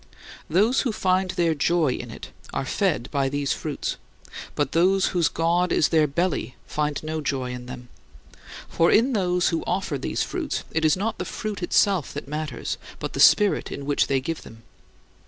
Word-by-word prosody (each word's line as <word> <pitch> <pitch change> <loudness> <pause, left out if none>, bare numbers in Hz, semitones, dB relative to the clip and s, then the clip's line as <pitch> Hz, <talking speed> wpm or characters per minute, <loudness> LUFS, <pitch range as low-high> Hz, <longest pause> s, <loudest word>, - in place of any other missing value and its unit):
Those 210 +10 +3
who 245 - 0
find 185 -2 +1
their 170 -2 +1
joy 160 0 +2
in - - -6
it - - -9 0.2
are - - -2
fed 170 - 0
by 140 -2 +1
these 145 0 -1
"fruits"; - - -4 0.6
but - - 0
those 185 +3 +3
whose 175 -4 +2
god 175 +2 +1
is 150 - +3
their 155 -2 +4
belly 155 -3 -1
find 150 -1 -2
no 155 0 -3
joy 130 -3 -2
in 125 0 -7
them. 125 -1 -8 0.8
For 165 0 +2
in 250 +5 +4
those 180 -4 +2
who 165 - -1
offer 180 -6 -1
these - - -1
fruits, - - -3
it 160 - -1
is 155 +2 +4
not 220 +3 -2
the - - -1
fruit 210 -3 -5
itself 180 -3 +2
that 145 - -5
matters, 150 -4 -4 0.2
but - - -5
the - - -4
spirit 205 -2 +5
in 140 - -6
which 145 0 +2
they 135 -1 +2
give 165 +5 -4
them. 115 0 -14
165 Hz, 185 wpm, -24 LUFS, 140-185 Hz, 0.8 s, spirit